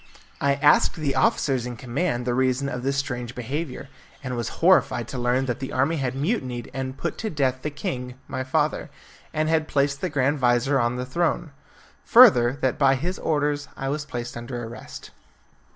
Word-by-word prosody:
I 140 0 +3
asked 145 +1 +4
the 145 -3 -1
officers 130 -1 +1
in 120 - -5
command 125 +2 -2
the 125 - 0
reason 130 +2 +1
of 125 -1 -4
this 135 +2 -1
strange 125 -4 -3
behaviour, 135 +4 -4 0.4
and 130 -2 -3
was 120 -2 -2
horrified - - +3
to 130 - -4
learn 125 +2 +1
that 125 -2 -2
the 135 - -5
army 140 +6 +1
had 130 -2 -2
mutinied 135 - -2
and 130 0 -4
put - - -4
to 220 - -2
death 130 -6 0
the 150 - -2
king, 125 -3 -5
my 130 -1 -3
father, 130 - 0 0.4
and 155 0 0
had 160 -1 +1
placed 140 -1 0
the - - -1
grand 145 0 +1
vizir 125 +2 +2
on 120 0 +1
the 125 0 -3
throne. 165 +3 -1 0.5
Further, 160 - +7
that 130 - 0
by 135 -1 +5
his 175 +8 -3
orders 145 -1 0
I 135 -1 -3
was 145 +1 -2
placed 120 -4 -5
under 120 +1 -5
arrest. 115 -1 -9
135 Hz, 185 wpm, -24 LUFS, 125-145 Hz, 0.5 s, Further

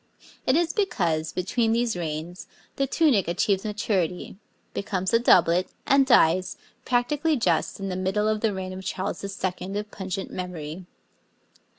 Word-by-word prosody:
It 260 - +4
is 330 -1 +1
because, 170 - 0
between 225 +5 0
these 235 -2 +1
reigns, 165 +1 -5 0.3
the 275 - 0
tunic 270 - +3
achieves 190 +3 +1
maturity, 205 -6 -2 0.4
becomes 195 0 -2
a 230 - +6
doublet, 180 -5 +4 0.2
and 275 -1 +4
dies, 185 -6 +4 0.3
practically 285 +6 +1
just 230 -4 0
in 195 0 -3
the 185 - -3
middle 190 +3 0
of 215 -1 0
the 225 - +2
reign 190 -1 -5
of 190 0 -7
Charles 190 +1 -3
II. 195 0 -3
of 210 0 -5
pungent 190 0 -5
memory. 175 -1 -6
195 Hz, 150 wpm, -25 LUFS, 180-230 Hz, 0.4 s, a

